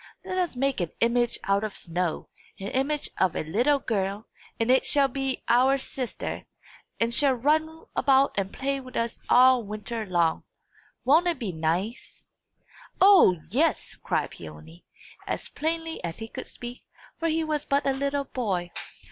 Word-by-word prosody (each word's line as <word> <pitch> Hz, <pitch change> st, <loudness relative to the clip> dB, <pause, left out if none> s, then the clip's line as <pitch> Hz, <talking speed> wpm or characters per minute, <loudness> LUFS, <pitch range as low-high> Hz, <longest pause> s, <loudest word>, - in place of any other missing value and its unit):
Let 370 Hz, 0 st, -2 dB
us 350 Hz, -6 st, -1 dB
make 270 Hz, -4 st, 0 dB
an 170 Hz, -, -1 dB
image 240 Hz, 0 st, +2 dB
out 200 Hz, +1 st, +1 dB
of 215 Hz, -2 st, -4 dB
snow 175 Hz, -1 st, -2 dB, 0.3 s
an 195 Hz, +1 st, -4 dB
image 285 Hz, +3 st, -1 dB
of 185 Hz, -3 st, +2 dB
a -, -, -1 dB
little 240 Hz, -, +2 dB
girl 200 Hz, -4 st, -2 dB, 0.3 s
and 230 Hz, +2 st, +2 dB
it 260 Hz, -, +4 dB
shall 280 Hz, -1 st, +3 dB
be 270 Hz, 0 st, -3 dB
our 260 Hz, +3 st, +4 dB
sister, 260 Hz, -2 st, -4 dB, 0.5 s
and 230 Hz, +1 st, +1 dB
shall 275 Hz, +1 st, +4 dB
run 315 Hz, +5 st, 0 dB
about 275 Hz, 0 st, +4 dB
and 195 Hz, -1 st, -1 dB
play 275 Hz, 0 st, -2 dB
with 255 Hz, -1 st, -11 dB
us 230 Hz, 0 st, -2 dB
all 255 Hz, 0 st, +6 dB
winter 215 Hz, +1 st, -5 dB
long. 170 Hz, -3 st, +1 dB, 0.6 s
Won't 315 Hz, +7 st, +5 dB
it 345 Hz, -, +1 dB
be 225 Hz, -7 st, -3 dB
nice?" 175 Hz, +8 st, -3 dB, 0.7 s
"O, 380 Hz, -, +7 dB
yes!" 295 Hz, +5 st, +1 dB
cried -, -, -2 dB
Peony, 80 Hz, +2 st, -12 dB, 0.4 s
as -, -, -3 dB
plainly 325 Hz, +1 st, -3 dB
as 170 Hz, -1 st, -4 dB
he 225 Hz, -, -6 dB
could -, -, -7 dB
speak, 240 Hz, +1 st, -8 dB, 0.4 s
for 330 Hz, -, 0 dB
he 320 Hz, 0 st, +1 dB
was 305 Hz, -2 st, -1 dB
but 280 Hz, +1 st, +1 dB
a 275 Hz, -, +2 dB
little 280 Hz, +1 st, -1 dB
boy. 190 Hz, -10 st, -2 dB
250 Hz, 165 wpm, -26 LUFS, 200-280 Hz, 0.7 s, O